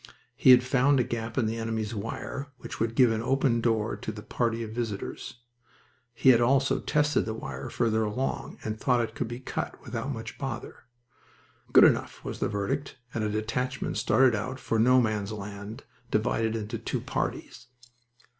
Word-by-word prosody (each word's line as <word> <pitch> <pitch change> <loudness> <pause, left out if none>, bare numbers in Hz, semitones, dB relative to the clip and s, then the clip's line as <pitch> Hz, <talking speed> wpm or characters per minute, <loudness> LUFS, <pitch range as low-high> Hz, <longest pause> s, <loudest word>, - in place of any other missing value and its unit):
He - - +4
had 125 -1 +9
found 135 +2 +3
a - - +4
gap 115 -1 -4
in 125 - +3
the 110 +1 -1
enemy's 110 -1 -2
wire 115 +6 -5
which - - -8
would 115 0 -1
give 125 -2 +5
an 110 0 -1
open 130 -1 +2
door 110 -2 +1
to - - -5
the 105 -1 -9
party 115 -1 -1
of 110 - -6
visitors. 115 +1 -5 0.7
He 130 - +4
had 120 -2 +7
also 135 +3 +3
tested 150 -1 +1
the 110 - -3
wire 70 -10 -6
farther 110 -2 +1
along, 110 +6 -3
and 110 0 -4
thought 125 -1 +2
it 110 -1 -3
could 115 - -3
be 120 +1 -6
cut 130 - -4
without 140 - -4
much 115 -2 -7
bother. 135 -4 -6 0.9
"Good - - +8
enough!" - - +2
was - - -5
the - - 0
verdict, 120 +8 -2 0.2
and 110 - -1
a 105 - 0
detachment 120 +5 -2
started 130 -2 +4
out 130 +5 -3
for 115 - -1
No 125 +3 +6
Man's 110 -3 0
Land, 100 +1 -7 0.3
divided 110 +1 +1
into 110 +1 -4
two 115 - -3
parties. - - -4
115 Hz, 180 wpm, -28 LUFS, 110-130 Hz, 0.9 s, had